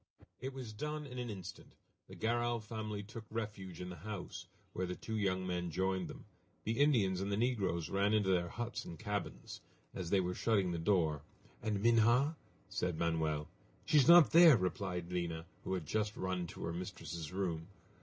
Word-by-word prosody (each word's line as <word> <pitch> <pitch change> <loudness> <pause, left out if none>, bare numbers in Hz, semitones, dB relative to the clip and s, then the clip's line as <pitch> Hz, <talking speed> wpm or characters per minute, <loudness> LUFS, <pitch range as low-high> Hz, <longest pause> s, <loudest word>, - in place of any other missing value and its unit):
It 135 +1 -4
was 130 -5 -7
done 150 +6 -4
in 125 -2 -7
an 120 -1 -3
instant. 95 -3 -8 0.3
The - - -11
Garral 120 +1 0
family 110 -1 -5
took 115 +2 -9
refuge 105 -6 -5
in 90 - -5
the 90 - -7
house, 90 -1 -6 0.3
where 90 0 -2
the 90 - -3
two 110 - -5
young 95 -3 0
men 90 -1 -2
joined 95 +2 0
them. - - -10 0.4
The 115 +4 -1
Indians 110 -11 +3
and 100 +1 -2
the 100 - +1
negroes 105 -9 0
ran 100 +1 +2
into 105 -3 +3
their 85 -2 +2
huts 120 +3 -4
and 85 - -8
cabins. 105 -2 -4 0.3
As 90 -3 -4
they 100 - +4
were 90 0 0
shutting 100 -3 +2
the 85 - -2
door: 80 -5 +2 0.4
"And 105 -2 -1
Minha?" 120 +6 +4 0.3
said 90 -3 -2
Manoel. 80 -3 0 0.4
"She 155 - +4
is 140 - +6
not 170 -4 +9
there!" 165 -5 +9
replied 90 -2 -2
Lina, 85 -2 -2 0.2
who 95 - -1
had 90 -4 -4
just 105 +5 -1
run 95 -2 -2
to - - -8
her 85 - -2
mistress' 85 -3 -5
room. 85 -4 -2
100 Hz, 185 wpm, -35 LUFS, 90-115 Hz, 0.4 s, not